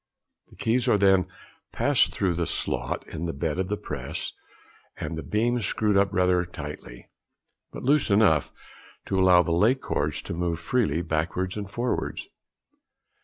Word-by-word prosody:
The - - -17
keys 120 +2 0
are 110 - +4
then 95 -2 +4 0.4
passed - - +2
through 95 -3 0
the 85 -1 -2
slot 60 +1 -2
in 80 +2 -5
the 85 - -3
bed 75 +4 -2
of 95 - 0
the 105 +1 -2
"press," 70 -10 -5 0.6
and - - -4
the 80 - -4
beam 120 +5 0
screwed 105 +1 0
up 100 0 +3
rather 90 -2 +2
tightly; 75 -7 -9 0.7
but - - -8
loose 145 0 +3
enough 100 -8 +3 0.5
to 95 - 0
allow 90 -1 +6
the 85 - -2
lay 105 +10 +4
cords 130 - -2
to - - -5
move 85 -1 -2
freely 85 - 0
|24| - - -13
backwards 90 +4 -1
or 105 -2 -4
forwards. 120 +5 -3
90 Hz, 165 wpm, -26 LUFS, 85-105 Hz, 0.7 s, allow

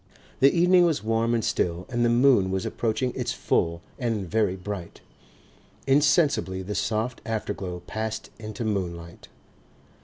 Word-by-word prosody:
The 135 +1 +6
evening 180 +1 +5
was 155 -11 -1
warm 115 +1 +1
and 115 - -1
still 85 +1 -1
and 120 -2 -1
the 120 - +3
moon 120 -5 +4
was 95 0 -2
approaching 120 +2 -1
its - - -2
full 85 +1 0 0.2
and 115 -6 -1
very 105 -1 +1
bright. 95 -2 -7 0.8
Insensibly 140 - +2
the 100 +3 -4
soft 110 +4 -1
afterglow 100 -5 -4
passed 110 +1 -4
into 110 +1 -5
moonlight. 85 -5 -4
110 Hz, 135 wpm, -26 LUFS, 95-120 Hz, 0.8 s, The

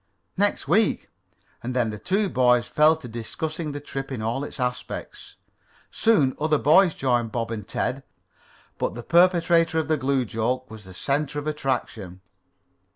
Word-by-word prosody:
"Next 200 -5 0
week." 205 +7 +2 0.5
And 125 +2 -5
then 120 -3 +1
the 105 - -7
two 200 - 0
boys 125 -6 +3
fell 155 +1 +4
to 155 -5 -10
discussing 150 +7 -4
the 145 - -5
trip 135 -1 -6
in 130 - -4
all 115 +5 -2
its 145 - -8
aspects. 125 0 -5 0.6
Soon 175 -13 +2
other 155 0 +2
boys 165 +5 +4
joined 120 -4 0
Bob 115 0 -3
and 105 -3 -5
Ted, - - -2 0.8
but - - -2
the 120 - -7
perpetrator 170 -1 +3
of 160 - 0
the 155 - +2
glue 135 -1 0
joke 120 +3 -2
was 110 -2 -10
the 95 - -12
center 145 +6 -1
of 145 - -4
attraction. 120 -11 -3
135 Hz, 160 wpm, -24 LUFS, 120-160 Hz, 0.8 s, fell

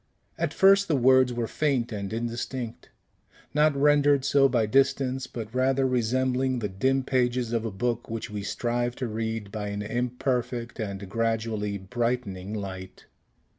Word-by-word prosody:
At - - -1
first 195 +1 +5
the 155 - +2
words 130 0 +5
were 120 -1 -2
faint 130 -2 0
and 100 -2 -4
indistinct, 120 +1 -4 0.6
not 150 0 +3
rendered 145 -1 +4
so 140 -1 +4
by 120 -3 +2
distance, 135 +2 +1
but 110 -2 -7
rather 130 +1 +2
resembling 130 +1 +1
the 110 -3 -2
dim 130 +8 +1
pages 125 -2 0
of 115 -1 0
a 110 - -2
book 120 +4 -2
which 115 -1 -4
we 105 -2 -5
strive 120 +3 -2
to 125 - -3
read 110 -2 -3
by 105 -1 -4
an 100 0 -3
imperfect 120 +1 -2
and 100 -2 -4
gradually 110 -1 -1
brightening 105 -2 -3
light. 95 -3 -7
120 Hz, 150 wpm, -27 LUFS, 110-130 Hz, 0.6 s, first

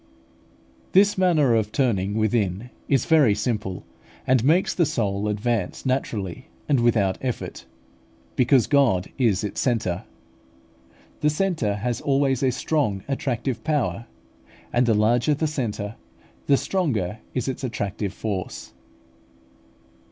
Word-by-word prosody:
This 200 +2 +5
manner 165 -9 +3
of 110 -2 +1
turning 105 -7 0
within 110 0 0 0.2
is 135 -4 +2
very 145 -10 +4
simple, 105 -5 -3 0.4
and 130 -3 +3
makes 165 +7 +3
the 170 -4 +2
soul 100 -4 -1
advance 105 -1 -2
naturally 125 -4 -2 0.2
and 140 -4 +3
without 110 -5 +2
effort; 125 -2 -5 0.7
because 125 -1 +4
God 125 -11 +2
is 110 -6 +2
its 105 - -3
centre. 115 -9 -1 1.1
The 150 - +2
centre 150 - 0
has 120 +4 -2
always 135 -2 +1
a 135 - +3
strong 125 -7 -1
attractive 125 -3 -2
power; 120 - -1 0.7
and 120 0 +3
the 115 - +4
larger 120 +7 +3
the 155 - -1
centre, 110 -8 -3 0.5
the 140 - +5
stronger 115 - -1 0.2
is 125 -1 -1
its 130 0 -4
attractive 100 -4 -3
force. 100 -3 -5
120 Hz, 120 wpm, -24 LUFS, 105-140 Hz, 1.1 s, This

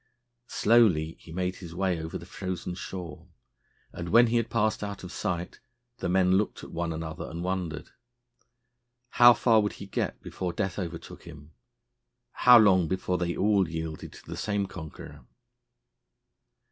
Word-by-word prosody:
Slowly 95 -9 +3
he 85 - -14
made 90 +2 -2
his 85 -3 -10
way 90 -2 0
over 80 0 -5
the - - -11
frozen 90 -1 -5
shore, 90 -4 -8 0.7
and, 85 0 -6
when 120 +6 +7
he 120 0 +1
had 115 -1 -1
passed 110 -2 0
out 100 -1 -6
of 90 - -8
sight, 85 -1 -4 0.4
the - - -2
men 95 0 +3
looked 105 - -3
at - - -10
one 85 0 -2
another 80 0 -5
and 85 +2 -6
wondered. 90 -4 -3 1.2
How 120 -1 +7
far 115 0 +4
would 105 - -2
he 100 - -9
get 95 - -3
before 90 -2 -4
death 95 -3 -2
overtook 85 -3 -7
him? 75 -2 -12 0.8
How 125 -1 +7
long 95 -6 +5
before 90 +1 -1
they 85 -1 -1
all 100 -4 +2
yielded 80 -1 -5
to - - -14
the - - -7
same 100 -1 -1
conqueror? 80 -5 -10
90 Hz, 160 wpm, -28 LUFS, 85-100 Hz, 1.2 s, when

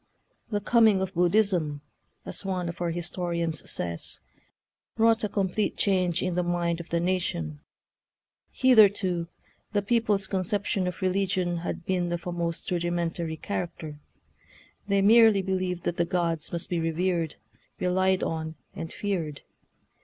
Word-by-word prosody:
" - - -43
The 205 - 0
coming 220 -2 +4
of 190 0 -3
Buddhism," 175 -5 +2 0.4
as - - -2
one 185 -3 -2
of 170 - -7
our 175 - 0
historians 170 -1 -2
says, 85 -1 -4 0.8
"wrought 225 0 +4
a 210 - 0
complete 200 +1 -1
change 180 -3 +2
in 180 -1 -1
the 180 - +1
mind 175 -1 0
of 170 - -9
the 170 - +1
na 185 +2 +1
tion. 75 - -4 0.9
Hitherto 200 -8 +4 0.5
the 205 -1 +1
people's 210 -3 +1
conception 190 0 -1
of 180 +2 -5
religion 185 -2 +1
had 170 0 -4
been 180 -2 0
of 175 0 -3
a 180 - -2
most 170 -1 -2
rudimen 175 -1 0
tary 160 -2 -4
character. 160 -5 -5 0.9
They 200 -1 +2
merely 220 -2 +6
believed 185 -2 -2
that 170 - -2
the 170 - +2
gods 170 -3 -1
must 170 -1 -3
be 175 - -1
revered, 165 0 0 0.4
relied 185 +1 +2
on, 160 -1 -3 0.2
and 165 -1 -6
feared. 170 -8 -3
180 Hz, 145 wpm, -27 LUFS, 170-195 Hz, 0.9 s, merely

